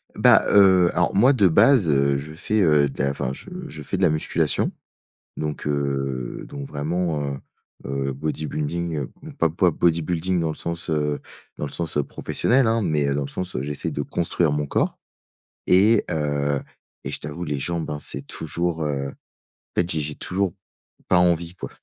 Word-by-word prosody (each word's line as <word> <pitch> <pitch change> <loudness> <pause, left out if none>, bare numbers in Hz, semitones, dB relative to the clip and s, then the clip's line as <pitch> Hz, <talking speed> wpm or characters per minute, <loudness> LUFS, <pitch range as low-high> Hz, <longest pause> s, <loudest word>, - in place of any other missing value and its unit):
Bah, - - +6
heu, 95 -3 +6
alors 90 +2 +1
moi 125 +7 +6
de 105 -8 +4
base, 105 - +5
heu, 70 0 +3
je 75 +2 -7
fais, 105 +6 -1
heu, 75 -4 +4
de 65 - -5
la 70 0 +2
enfin 65 -2 -3
je 65 - -8 0.2
je 75 - -7
fais - - -3
de - - -3
la - - +5
musculation. 75 0 +1 0.7
Donc 75 -1 -4
heu, 70 -3 -2
donc 70 -1 -7
vraiment, 80 +2 -2
heu 70 -1 -3 0.5
heu, 70 0 -2
bodybuilding 75 +1 -3 0.3
pas 80 -1 +3
pas 90 +2 +3
bodybuilding 85 +2 +1
dans 80 - 0
le 80 - -3
sens, 85 0 -4
heu, 75 -2 0 0.4
dans 75 - -2
le - - -7
sens, 80 -3 -3
heu, - - +3
professionnel, 125 - +1
hein! 115 +1 +2
Mais, 75 -7 +1
heu, 70 - +1
dans 70 - 0
le - - -5
sens, 90 0 -4
heu, 65 - -2
j'essaie 75 0 -3
de - - -4
construire 85 -2 0
mon 75 0 -1
corps. - - 0 0.7
Et 105 +5 +5
heu 75 -2 0 0.5
et - - -3
je - - -3
t'avoue 80 +4 -5
les 75 -2 -2
jambes, 85 +3 -3
hein, 75 0 -3
c'est - - -4
toujours, 80 0 -3
heu, 70 -2 -2
en - - -8 0.6
fait 85 0 +1
j'ai 80 - +3
j'ai 75 0 -3
toujours 95 0 -1 0.6
pas 90 - +5
envie 85 0 +1
quoi. - - -7
80 Hz, 190 wpm, -23 LUFS, 70-90 Hz, 0.7 s, Bah